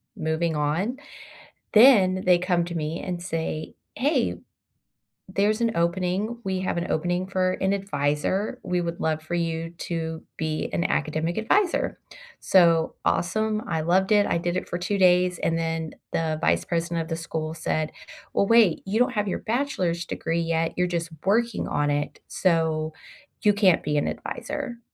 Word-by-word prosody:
moving 160 +1 -1
on. 160 - 0 0.8
Then 200 -6 +6
they 180 -1 +6
come 175 -1 +1
to 175 - -6
me 160 +1 -3
and 180 -2 -4
say, 160 -2 -4 0.2
"Hey, 265 0 +1 0.9
there's 205 +4 +1
an 230 -1 +2
opening, 185 +6 0
we 190 -1 -1
have 185 -2 -1
an 170 - -3
opening 175 +3 0
for 185 -1 +1
an 195 +1 +2
adviser, 190 +1 -1
we 180 0 -1
would 170 0 -4
love 155 -1 0
for 165 +2 -5
you 165 -1 -2
to 160 -1 -4 0.2
be 155 -1 -2
an 170 - 0
academic 155 +2 -1
adviser," 355 - +1 0.4
so, 170 -3 +4
awesome, 215 +4 +1
I 160 -2 -1
loved 190 +5 +2
it, 205 -1 +5
I 170 - +1
did 175 +1 -2
it - - -2
for 175 - -3
2 200 +3 -1
days, 180 -1 +4
and 165 0 +1
then 165 -1 -2 0.2
the 160 -1 0
vice - - +2
president 170 0 -1
of 160 - -8
the 165 - -2
school 160 -1 -4
said, 155 -1 -2 0.4
"Well, 200 - +2
wait, 225 -7 +4
you 205 +4 0
don't 250 +1 +3
have 210 -3 -1
your - - -2
bachelor's 190 -9 -1
degree 165 +1 -2
yet, 165 0 0
you're 180 - +3
just 170 -1 -3 0.2
working 230 +3 +1
on 145 0 0
it, 145 0 -2
so 160 -3 +1 0.5
you 210 - +5
can't 200 -4 +3
be 150 -1 0
an - - 0
adviser." 260 -5 -5
175 Hz, 170 wpm, -25 LUFS, 165-195 Hz, 0.9 s, Then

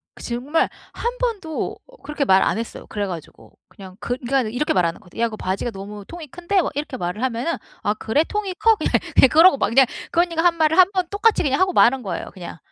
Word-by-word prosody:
그 - - -13
정말 255 +7 0 0.3
1 480 +1 -3
번도 405 -11 -3
어 - - -19
그렇게 295 -1 -2
말 190 -6 +4
안 - - +1
했어요, 230 - -7
그래 205 -1 -3
가지고. 170 -5 -10
그냥 190 -1 -13
그 245 - -2
그러니까 265 +2 0
이렇게 250 +7 0
말하는 170 -2 0
건데, 180 -1 -16
"야 235 - +3
이거 220 -2 -6
바지가 190 +4 -3
너무 205 0 -9
통이 335 -2 -9
큰데?" 350 +6 -1
막 - - -1
이렇게 290 -2 -4
말을 180 +4 -4
하면은 260 +6 -1 0.3
"아 205 - 0
그래 220 +7 +1
통이 400 0 -3
커?" 450 +4 +4
그냥 - - -2 0.4
그러고 325 0 +6
막 - - +1
그냥 260 +4 +5 0.3
그 340 - +3
언니가 335 -1 0
한 345 -1 +4
말을 320 -1 +2
1 370 +1 +7
번 370 -2 0
똑같이 410 +3 +2
그냥 275 0 0
하고 375 0 +3
마는 260 -4 +4
거예요, 190 -5 -5
그냥. 175 -2 -9
275 Hz, 430 characters per minute, -21 LUFS, 210-350 Hz, 0.4 s, 1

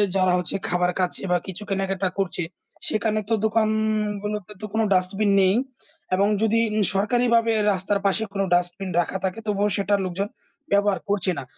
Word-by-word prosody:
যারা 185 -1 +3
হচ্ছে 180 - 0
খাবার 180 0 +2
খাচ্ছে 180 -1 +1
বা 180 - +4
কিছু 190 +2 -5
কেনাকাটা 195 -1 -1
করছে, 180 -2 -1 0.4
সেখানে 215 0 0
তো - - +2
দোকানগুলো 215 -1 0 0.2
তো - - -4
কোন 220 - +1
ডাস্টবিন 195 +3 +2
নেই। 190 +2 +4 0.6
এবং 200 +2 +3
যদি 225 +1 +3 0.3
সরকারিভাবে 230 +3 +2 0.2
রাস্তার 195 +2 0
পাশে 200 +3 +2
কোন 195 - -1
ডাস্টবিন 180 +2 0
রাখা 175 +2 -1
থাকে, 190 +3 -2
তবুও 205 0 +1
সেটা 200 0 +1
লোকজন 185 +2 -2 0.4
ব্যবহার 200 -2 +3
করছে 195 -2 +1
না। - - -4
200 Hz, 155 wpm, -24 LUFS, 185-215 Hz, 0.6 s, বা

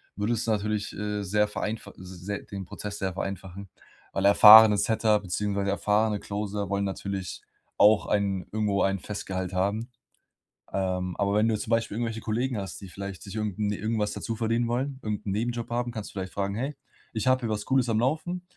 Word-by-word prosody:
würde 105 +4 0
es 115 0 -2
natürlich, 105 -1 -1
äh, 105 0 -3
sehr 105 +2 +2
vereinfach 105 0 -4
sehr 95 +2 -6
den 100 -1 -7
Prozess 105 +3 -6
sehr 95 -1 -2
vereinfachen, 95 +1 -6 0.4
weil 95 - 0
erfahrene 105 +1 +10
Setter 110 0 +2
beziehungsweise 100 +1 -2
erfahrene 105 +1 +1
Closer 100 -1 -4
wollen 100 0 0
natürlich 95 -1 -4 0.4
auch 105 0 +5
ein 100 -3 0
irgendwo 105 -2 0
ein 95 -1 +1
Festgehalt 95 -2 -4
haben. 100 +6 -1 0.8
Ähm, 90 -1 -1
aber 100 0 +1
wenn 110 +2 +3
du 110 - +2
zum 110 - -6
Beispiel 115 -2 +1
irgendwelche 115 -1 -2
Kollegen 120 +3 -1
hast, 95 -3 -6
die 95 - -9
vielleicht 100 0 -7
sich 100 +2 -8
irgend 105 -2 -3
'n 105 -1 0
irgendwas 110 0 -1
dazuverdienen 115 +1 -1
wollen, 130 +3 -2
irgend 105 -1 -4
'n 100 - -1
Nebenjob 120 +3 -2
haben, 120 +1 -1
kannst 110 -3 -6
du - - -16
vielleicht 95 -1 -5
fragen: 100 0 -2
„Hey, 135 +7 -3 0.4
ich 110 +1 -3
habe 130 0 +4
hier 115 - -3
was 105 -1 -2
Cooles 130 -2 +2
am 110 -1 +1
Laufen, 160 +8 -1
105 Hz, 185 wpm, -27 LUFS, 100-110 Hz, 0.8 s, erfahrene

